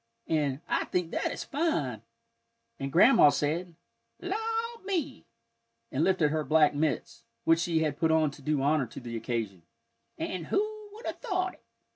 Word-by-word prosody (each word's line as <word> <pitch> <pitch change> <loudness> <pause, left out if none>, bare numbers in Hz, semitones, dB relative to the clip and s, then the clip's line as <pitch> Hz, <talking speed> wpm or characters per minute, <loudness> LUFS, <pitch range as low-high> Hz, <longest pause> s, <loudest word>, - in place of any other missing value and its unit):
and, 145 -3 0
"I - - 0
think 180 -2 -1
that - - -1
is - - -5
fine!" 155 - -1 0.8
And 135 0 -3
Grandma 175 - +7
said, 165 +5 -1 0.4
"La 370 +2 -3 0.5
me!" 335 -9 -3 0.6
and 135 +4 +1
lifted 175 -5 +3
her 155 0 0
black 155 -1 +4
mitts, 145 -3 -1 0.2
which 165 0 +4
she 165 -2 +1
had 150 -2 -2
put 160 - +3
on 160 -2 +3
to 140 - -14
do 145 -1 0
honor 145 -2 +2
to - - -9
the 120 -2 -7
occasion, 110 -6 -3 0.6
"and 175 -4 -4
who 425 +1 -1
would 445 +3 -11
have - - -4
thought 370 -6 -1
it!" - - -22
160 Hz, 165 wpm, -29 LUFS, -, 0.8 s, Grandma